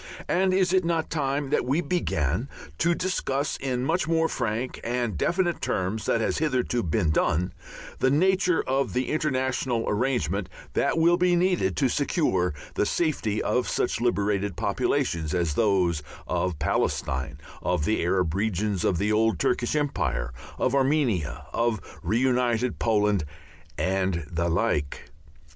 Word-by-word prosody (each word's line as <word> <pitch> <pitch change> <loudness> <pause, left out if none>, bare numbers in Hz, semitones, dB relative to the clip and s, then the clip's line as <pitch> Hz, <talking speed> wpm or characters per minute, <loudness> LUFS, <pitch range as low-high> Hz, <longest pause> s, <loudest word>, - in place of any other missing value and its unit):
And 190 +1 +2
is 185 -1 +2
it 185 -1 +4
not 165 -1 -1
time 140 -2 -1
that - - +2
we 135 +6 +1
began 115 - -1 0.3
to 170 +1 +3
discuss 145 -6 -1
in 130 -2 -2
much 165 +3 0
more 165 0 +2
frank 115 -2 -2
and 120 -4 -1
definite 175 - 0
terms 100 +4 -1
than 115 - +2
has - - 0
hitherto 130 -5 0
been 85 -2 +1
done, 90 +3 +1 0.5
the 130 - +3
nature 180 +4 +3
of 130 -5 0
the 130 0 -1
international 130 -5 0
arrangement 105 - 0 0.2
that - - +1
will 170 +2 +4
be 180 0 +3
needed 175 - +1
to - - +3
secure 90 -4 0 0.2
the - - +1
safety 135 -11 0
of 125 - 0
such 120 - 0
liberated 100 -4 0
populations 80 -2 0
as 85 -4 0
those 90 -6 +2 0.2
of 90 -4 -1
Palestine, 65 -1 -1 0.2
of 75 - 0
the 110 - +1
Arab 90 -2 +1
regions 100 -1 -1
of 90 - +2
the 105 +4 0
old 110 -2 +2
Turkish 120 - 0
empire, 135 - -1 0.2
of 130 - +1
Armenia, 135 - +1
of 115 -2 +1 0.2
reunited 125 0 +1
Poland, 105 -5 +2 0.5
and 95 -3 0
the 85 +1 0
like? 75 -6 -1
120 Hz, 145 wpm, -26 LUFS, 95-145 Hz, 0.5 s, it